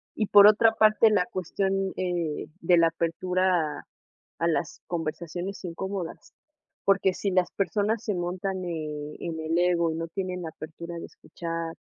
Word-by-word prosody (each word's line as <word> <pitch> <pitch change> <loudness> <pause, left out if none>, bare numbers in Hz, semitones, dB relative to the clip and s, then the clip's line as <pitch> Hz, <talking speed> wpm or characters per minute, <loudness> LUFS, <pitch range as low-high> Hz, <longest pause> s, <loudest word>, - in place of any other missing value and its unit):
Y 215 - 0
por 205 0 +8
otra 225 +2 +6
parte, 215 0 +5
la 200 -4 +2
cuestión, 195 -1 -1
eh, 175 -4 -2
de 175 +1 +4
la 165 0 +5
apertura 170 -1 0 0.5
a 170 - +1
las 165 0 -1
conversaciones 175 +3 -4
incómodas, 185 0 -5 0.5
porque 195 -1 +3
si 195 +2 -2
las 185 -2 +2
personas 210 +2 0
se 210 - -1
montan, 185 +1 -3
eh, 150 -3 -5
en 165 -1 -4
el 160 +1 0
ego, 175 -1 +2
y - - -3
no 165 +1 -4
tienen 185 0 -4
la 165 - -4
apertura 170 +2 -8
de - - -7
escuchar, 165 -1 -6
175 Hz, 155 wpm, -27 LUFS, 165-195 Hz, 0.5 s, por